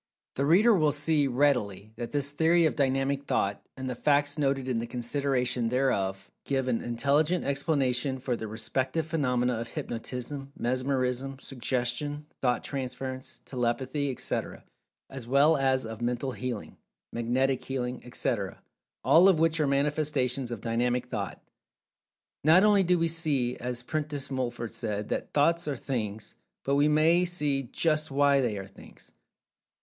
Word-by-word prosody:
The 140 Hz, +1 st, 0 dB
reader 210 Hz, +9 st, +6 dB
will 155 Hz, -6 st, +3 dB
see, 150 Hz, 0 st, +1 dB
readily, 120 Hz, -6 st, 0 dB
that 120 Hz, 0 st, -6 dB
this 140 Hz, -1 st, -1 dB
theory 165 Hz, +3 st, +3 dB
of 155 Hz, -, +1 dB
Dynamic 135 Hz, 0 st, 0 dB
Thought, 100 Hz, -5 st, 0 dB, 0.2 s
and 130 Hz, 0 st, -5 dB
the 130 Hz, -, -2 dB
facts 145 Hz, +3 st, +2 dB
noted 135 Hz, -3 st, 0 dB
in 125 Hz, -3 st, 0 dB
the 115 Hz, -, -4 dB
consideration 125 Hz, -1 st, -1 dB
thereof, 100 Hz, -7 st, 0 dB, 0.2 s
give 135 Hz, -2 st, -1 dB
an 120 Hz, -3 st, 0 dB
intelligent 145 Hz, +8 st, +1 dB
explanation 135 Hz, -2 st, 0 dB
for 130 Hz, -1 st, -2 dB
the 110 Hz, -1 st, -5 dB
respective 130 Hz, +8 st, -1 dB
phenomena 125 Hz, -6 st, 0 dB
of 115 Hz, -, -4 dB
Hypnotism, 125 Hz, +5 st, -5 dB
Mesmerism, 130 Hz, +1 st, -1 dB
Suggestion, 135 Hz, +3 st, -2 dB, 0.2 s
Thought 125 Hz, -2 st, +1 dB
transference, 130 Hz, -1 st, -5 dB
Telepathy, 130 Hz, +3 st, -1 dB
etc., 130 Hz, -, -3 dB, 0.4 s
as 130 Hz, -3 st, -8 dB
well 140 Hz, +5 st, +5 dB
as 135 Hz, -2 st, +1 dB
of 110 Hz, 0 st, -7 dB
Mental 125 Hz, +2 st, -1 dB
Healing, 125 Hz, -3 st, -5 dB, 0.4 s
Magnetic 125 Hz, +3 st, 0 dB
Healing, 125 Hz, -2 st, -3 dB
etc., 115 Hz, -5 st, -2 dB, 0.4 s
all 180 Hz, +4 st, +7 dB
of 185 Hz, -, +4 dB
which 165 Hz, 0 st, +2 dB
are 150 Hz, -, +2 dB
manifestations 140 Hz, -3 st, 0 dB
of 120 Hz, -4 st, -5 dB
"Dynamic 125 Hz, +2 st, 0 dB
Thought." 100 Hz, -5 st, -4 dB, 1.0 s
Not 165 Hz, +6 st, +6 dB
only 205 Hz, -2 st, +5 dB
do 180 Hz, -1 st, +3 dB
we 165 Hz, 0 st, +2 dB
see, 150 Hz, -7 st, 0 dB
as 125 Hz, 0 st, -4 dB
Prentice 145 Hz, -1 st, -3 dB
Mulford 120 Hz, -3 st, -3 dB
said, 105 Hz, -2 st, -3 dB
that -, -, -3 dB
"Thoughts 165 Hz, +3 st, +2 dB
are 145 Hz, -, -1 dB
Things," 110 Hz, -5 st, -4 dB, 0.3 s
but 140 Hz, -, +1 dB
we 145 Hz, +1 st, +4 dB
may 160 Hz, +4 st, +4 dB
see 150 Hz, -6 st, 0 dB
"just 155 Hz, -1 st, +1 dB
why" 140 Hz, 0 st, +3 dB
they 115 Hz, -5 st, -1 dB
are 95 Hz, -, -5 dB
Things. -, -, -15 dB
135 Hz, 150 wpm, -28 LUFS, 120-145 Hz, 1.0 s, all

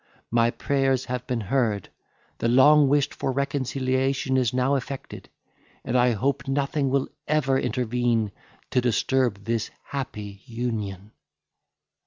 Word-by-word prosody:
My 115 Hz, 0 st, +4 dB
prayers 135 Hz, 0 st, 0 dB
have 125 Hz, 0 st, -4 dB
been 125 Hz, -3 st, -1 dB
heard, 110 Hz, -3 st, 0 dB, 0.5 s
the -, -, +1 dB
long 140 Hz, +4 st, +6 dB
wished 145 Hz, 0 st, +2 dB
for 135 Hz, -, -2 dB
reconciliation 130 Hz, 0 st, 0 dB
is 125 Hz, -3 st, +2 dB
now 130 Hz, +2 st, +1 dB
effected, 135 Hz, 0 st, -5 dB, 0.6 s
and -, -, -2 dB
I 125 Hz, -1 st, +4 dB
hope 135 Hz, +4 st, -1 dB
nothing 140 Hz, 0 st, 0 dB
will 135 Hz, 0 st, +1 dB, 0.2 s
ever 140 Hz, -3 st, +2 dB
intervene 120 Hz, -3 st, 0 dB, 0.4 s
to 125 Hz, -, +3 dB
disturb 120 Hz, -2 st, +1 dB
this 115 Hz, -1 st, -1 dB, 0.2 s
happy 105 Hz, -8 st, -5 dB
union." 110 Hz, -5 st, -4 dB
125 Hz, 125 wpm, -25 LUFS, 115-135 Hz, 0.6 s, long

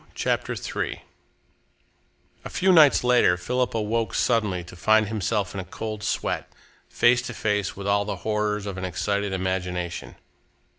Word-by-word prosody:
CHAPTER -, -, -1 dB
III -, -, -4 dB, 1.4 s
A -, -, -7 dB
few 190 Hz, 0 st, +2 dB
nights 155 Hz, -8 st, +6 dB
later 125 Hz, -8 st, +4 dB
Philip 125 Hz, +7 st, -1 dB
awoke 110 Hz, -1 st, -1 dB
suddenly 105 Hz, -7 st, +1 dB
to 90 Hz, +1 st, -12 dB
find 110 Hz, +4 st, +3 dB
himself 105 Hz, -1 st, -1 dB
in 100 Hz, -, -4 dB
a -, -, -3 dB
cold 110 Hz, +3 st, -6 dB
sweat, 105 Hz, -, -2 dB, 0.4 s
face 120 Hz, +1 st, +4 dB
to 125 Hz, -1 st, -7 dB
face 105 Hz, -2 st, -1 dB
with 100 Hz, -, -6 dB
all 100 Hz, 0 st, +2 dB
the 105 Hz, -, -3 dB
horrors 105 Hz, -1 st, 0 dB
of 100 Hz, -2 st, -5 dB
an -, -, -6 dB
excited 95 Hz, +4 st, -1 dB
imagination. 90 Hz, -2 st, -3 dB
105 Hz, 150 wpm, -25 LUFS, 95-110 Hz, 1.4 s, nights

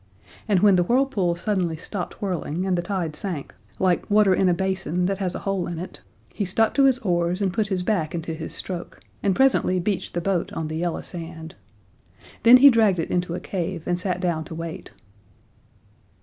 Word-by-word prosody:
And 200 Hz, -4 st, +3 dB
when 200 Hz, -3 st, +6 dB
the -, -, +4 dB
whirlpools 200 Hz, -7 st, +1 dB
suddenly 185 Hz, -6 st, 0 dB
stopped 180 Hz, +4 st, -6 dB
whirling 180 Hz, -2 st, -2 dB
and 190 Hz, -1 st, +1 dB
the 175 Hz, -, 0 dB
tide 175 Hz, -4 st, -3 dB
sank, 165 Hz, -4 st, -5 dB, 0.2 s
like 185 Hz, -2 st, +1 dB
water 205 Hz, -2 st, +5 dB
in 185 Hz, 0 st, +3 dB
a -, -, +4 dB
basin 185 Hz, -2 st, -1 dB
that 195 Hz, +1 st, -1 dB
has 185 Hz, -3 st, -2 dB
a -, -, -3 dB
hole 195 Hz, -3 st, -1 dB
in 170 Hz, -1 st, -5 dB
it, 180 Hz, +3 st, -8 dB, 0.3 s
he 210 Hz, -, -2 dB
stuck 215 Hz, +4 st, +1 dB
to 275 Hz, -, +4 dB
his 265 Hz, -2 st, +4 dB
oars 175 Hz, 0 st, +1 dB
and 195 Hz, -3 st, 0 dB
put 215 Hz, -1 st, 0 dB
his 190 Hz, -3 st, -2 dB
back 175 Hz, -6 st, -1 dB
into 165 Hz, -1 st, -4 dB
his 160 Hz, 0 st, -6 dB
stroke, 180 Hz, -2 st, -6 dB, 0.2 s
and 195 Hz, -2 st, +1 dB
presently 265 Hz, -8 st, +3 dB
beached 195 Hz, 0 st, -2 dB
the -, -, +1 dB
boat 185 Hz, -1 st, -1 dB
on 160 Hz, -1 st, -3 dB
the 155 Hz, -, -3 dB
yellow 170 Hz, 0 st, -2 dB
sand. 165 Hz, -2 st, -7 dB, 0.9 s
Then 235 Hz, +2 st, +9 dB
he 280 Hz, +2 st, +8 dB
dragged 220 Hz, -5 st, +3 dB
it 165 Hz, -, -3 dB
into 175 Hz, -1 st, -1 dB
a -, -, -4 dB
cave, 175 Hz, -3 st, -4 dB
and 175 Hz, 0 st, 0 dB
sat 180 Hz, -1 st, -2 dB
down 170 Hz, -4 st, -1 dB
to 160 Hz, -, -8 dB
wait. 165 Hz, 0 st, -7 dB
180 Hz, 205 wpm, -24 LUFS, 170-200 Hz, 0.9 s, Then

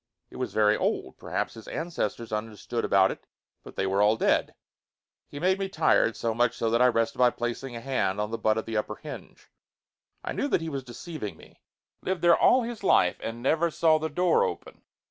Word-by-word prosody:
It -, -, -10 dB
was -, -, -3 dB
very 105 Hz, -1 st, +3 dB
old. -, -, -2 dB
Perhaps -, -, -3 dB
his 110 Hz, -2 st, -12 dB
ancestors 120 Hz, -, -3 dB
understood 110 Hz, +2 st, -4 dB
about 95 Hz, -1 st, +4 dB
it, -, -, -10 dB, 0.4 s
but -, -, -12 dB
they 95 Hz, -, -1 dB
were 95 Hz, +1 st, +1 dB
all 105 Hz, +2 st, +4 dB
dead. -, -, +1 dB, 0.7 s
He 145 Hz, -, -8 dB
made 185 Hz, +4 st, +2 dB
me 195 Hz, -1 st, -2 dB
tired, 155 Hz, -, +2 dB
so 115 Hz, -1 st, -1 dB
much 120 Hz, +1 st, +1 dB
so 115 Hz, -1 st, 0 dB
that 115 Hz, +1 st, +2 dB
I 125 Hz, -, +7 dB
rested 115 Hz, -2 st, 0 dB
by 125 Hz, -1 st, +6 dB
placing 120 Hz, +2 st, -4 dB
a 115 Hz, -, -6 dB
hand 115 Hz, -6 st, -1 dB
on 105 Hz, +1 st, -2 dB
the 115 Hz, -, -3 dB
butt 110 Hz, 0 st, +2 dB
of 110 Hz, -, -2 dB
the 110 Hz, -1 st, -3 dB
upper 105 Hz, 0 st, -2 dB
hinge. 150 Hz, +4 st, -11 dB, 0.7 s
I -, -, -4 dB
knew 285 Hz, -, -1 dB
that 225 Hz, -, +1 dB
he 165 Hz, -, -4 dB
was 135 Hz, -3 st, -4 dB
deceiving 125 Hz, -, -7 dB
me. -, -, -18 dB, 0.4 s
Lived 185 Hz, -1 st, -3 dB
there 170 Hz, -1 st, +7 dB
all 255 Hz, 0 st, +4 dB
his 230 Hz, -2 st, -6 dB
life 90 Hz, -, +3 dB
and 115 Hz, +1 st, -6 dB
never 160 Hz, +5 st, +2 dB
saw 160 Hz, -1 st, +3 dB
the 160 Hz, +1 st, -2 dB
door 175 Hz, +2 st, +2 dB
open! -, -, -5 dB
120 Hz, 215 wpm, -27 LUFS, 110-160 Hz, 0.7 s, I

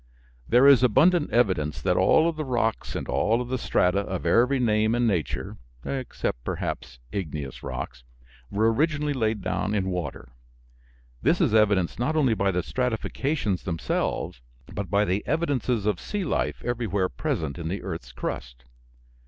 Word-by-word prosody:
There 125 Hz, +4 st, +6 dB
is 140 Hz, -3 st, +8 dB
abundant 145 Hz, -, +4 dB
evidence 90 Hz, -11 st, +1 dB
that -, -, +1 dB
all 160 Hz, -, +4 dB
of 170 Hz, -, -1 dB
the 155 Hz, -, -3 dB
rocks 120 Hz, -5 st, -1 dB
and -, -, -4 dB
all 115 Hz, +3 st, +2 dB
of 125 Hz, 0 st, -4 dB
the 130 Hz, 0 st, -1 dB
strata 90 Hz, -4 st, +2 dB
of 95 Hz, -3 st, -4 dB
every 125 Hz, +10 st, +3 dB
name 110 Hz, -1 st, +2 dB
and 120 Hz, 0 st, +2 dB
nature 90 Hz, -9 st, -1 dB, 0.3 s
(except 130 Hz, -, -3 dB
perhaps 60 Hz, -, -4 dB
igneous 75 Hz, -7 st, -5 dB
rocks) -, -, -6 dB, 0.5 s
were 110 Hz, +3 st, +2 dB
originally 150 Hz, +2 st, +1 dB
laid 110 Hz, -5 st, -1 dB
down 95 Hz, +3 st, -1 dB
in 95 Hz, -2 st, 0 dB
water. 90 Hz, -7 st, -5 dB, 0.9 s
This 160 Hz, +5 st, +2 dB
is 155 Hz, -, +2 dB
evidenced 100 Hz, -5 st, +3 dB
not 150 Hz, +6 st, 0 dB
only 135 Hz, -7 st, +3 dB
by 100 Hz, -2 st, +1 dB
the 90 Hz, -2 st, 0 dB
stratifications 125 Hz, -, -1 dB
themselves, 80 Hz, -7 st, -2 dB, 0.3 s
but 100 Hz, -4 st, -4 dB
by 100 Hz, +2 st, +3 dB
the 95 Hz, +1 st, 0 dB
evidences 130 Hz, -9 st, 0 dB
of 105 Hz, -4 st, +1 dB
sea 205 Hz, -2 st, -3 dB
life 160 Hz, -, -1 dB
everywhere 110 Hz, -6 st, 0 dB
present 70 Hz, +3 st, -3 dB
in 80 Hz, -, -4 dB
the 95 Hz, +4 st, -4 dB
earth's 65 Hz, +1 st, -6 dB
crust. -, -, -6 dB
110 Hz, 160 wpm, -26 LUFS, 90-130 Hz, 0.9 s, is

